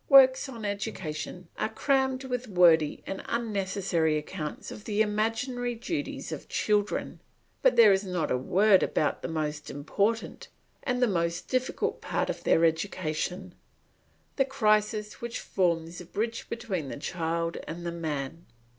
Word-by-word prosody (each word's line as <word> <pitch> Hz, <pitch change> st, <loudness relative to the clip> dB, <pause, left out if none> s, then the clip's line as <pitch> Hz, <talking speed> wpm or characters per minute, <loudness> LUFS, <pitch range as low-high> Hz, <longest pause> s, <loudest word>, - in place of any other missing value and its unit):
Works 270 Hz, -1 st, +7 dB
on 230 Hz, -4 st, -7 dB
education 185 Hz, -4 st, -4 dB
are 215 Hz, -, 0 dB
crammed 265 Hz, +2 st, +1 dB
with 250 Hz, -1 st, -3 dB
wordy 170 Hz, -6 st, +4 dB
and 195 Hz, -, -4 dB
unnecessary 195 Hz, -8 st, 0 dB
accounts 150 Hz, 0 st, -5 dB
of 210 Hz, -, -9 dB
the 210 Hz, -1 st, -1 dB
imaginary 230 Hz, +4 st, -1 dB
duties 290 Hz, +6 st, -4 dB
of -, -, -6 dB
children; 210 Hz, -1 st, 0 dB, 0.4 s
but -, -, +5 dB
there 215 Hz, -4 st, +8 dB
is 190 Hz, +1 st, +1 dB
not 180 Hz, -4 st, -2 dB
a -, -, +3 dB
word 195 Hz, +8 st, +4 dB
about 150 Hz, -, 0 dB
the -, -, -3 dB
most 150 Hz, -3 st, -3 dB
important 200 Hz, +10 st, -1 dB, 0.3 s
and 250 Hz, -2 st, -1 dB
most 170 Hz, -1 st, -1 dB
difficult 255 Hz, 0 st, -1 dB
part -, -, -1 dB
of -, -, -8 dB
their 165 Hz, -, +4 dB
education, 175 Hz, +2 st, -1 dB, 0.8 s
the 270 Hz, -, +5 dB
crisis 215 Hz, -5 st, +1 dB
which 235 Hz, -1 st, -4 dB
forms 170 Hz, -2 st, 0 dB
the 180 Hz, -, -8 dB
bridge 225 Hz, +6 st, -3 dB
between 195 Hz, -, -3 dB
the -, -, -5 dB
child 165 Hz, +2 st, -2 dB
and 170 Hz, +1 st, -6 dB
the 170 Hz, -, -1 dB
man. 160 Hz, -1 st, -4 dB
195 Hz, 145 wpm, -28 LUFS, 165-230 Hz, 0.8 s, there